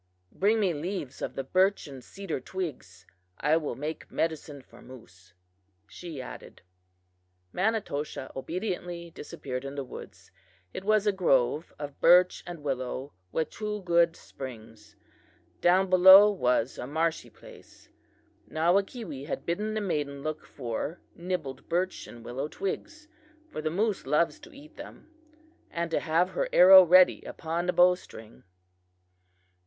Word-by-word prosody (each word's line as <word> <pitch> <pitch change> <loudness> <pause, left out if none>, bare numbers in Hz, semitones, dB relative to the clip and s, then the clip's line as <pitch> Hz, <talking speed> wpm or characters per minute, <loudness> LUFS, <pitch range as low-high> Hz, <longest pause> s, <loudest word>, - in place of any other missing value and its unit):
Bring 215 +3 +2
me 190 -5 +1
leaves 150 -3 -5
of - - -4
the 135 - -3
birch 185 +8 +2
and 135 -4 -10
cedar 195 +2 -5
twigs; 130 - -7 0.3
I 150 +2 +3
will 155 -3 -3
make 150 +3 -6
medicine 155 -4 -3
for 120 -1 -18
moose,' 90 -8 -16 0.5
she 165 - -9
added. 125 - -10 0.9
"Manitoshaw 185 -10 -2
obediently 175 +2 -5
disappeared 130 -4 -7
in 140 +1 -7
the 140 - -3
woods. 130 - -12 0.4
It 190 - -6
was 215 0 +2
a 205 - +4
grove 150 -5 +1
of 145 -1 -8
birch 180 +2 +5
and 170 -4 -8
willow, 130 0 -4 0.2
with 160 - -2
two 210 -1 -5
good 170 -1 +3
springs. 110 -5 -11 0.7
Down 185 +2 +4
below 190 +3 +9
was 125 - 0
a 125 - -5
marshy 160 +3 -1
place. - - -17 0.6
Nawakewee 175 - -1
had - - -4
bidden 210 +6 -2
the 215 - -1
maiden 145 -7 -3
look 155 0 -5
for 130 +6 -5 0.2
nibbled 170 -6 -5
birch 180 +2 -1
and 120 -1 -12
willow 130 +4 -4
twigs, 305 - -5 0.4
for - - -5
the 155 - -1
moose 200 - -1
loves 150 - +1
to 330 +3 -14
eat 295 +1 -15
them, 320 - -12 0.6
and 170 0 -3
to - - +1
have 170 +3 +1
her - - -2
arrow 190 +1 +10
ready 180 +1 +5
upon 170 +2 -4
the 180 - +1
bow 180 +1 +6
string. 110 -10 -12
165 Hz, 140 wpm, -28 LUFS, 140-185 Hz, 0.9 s, arrow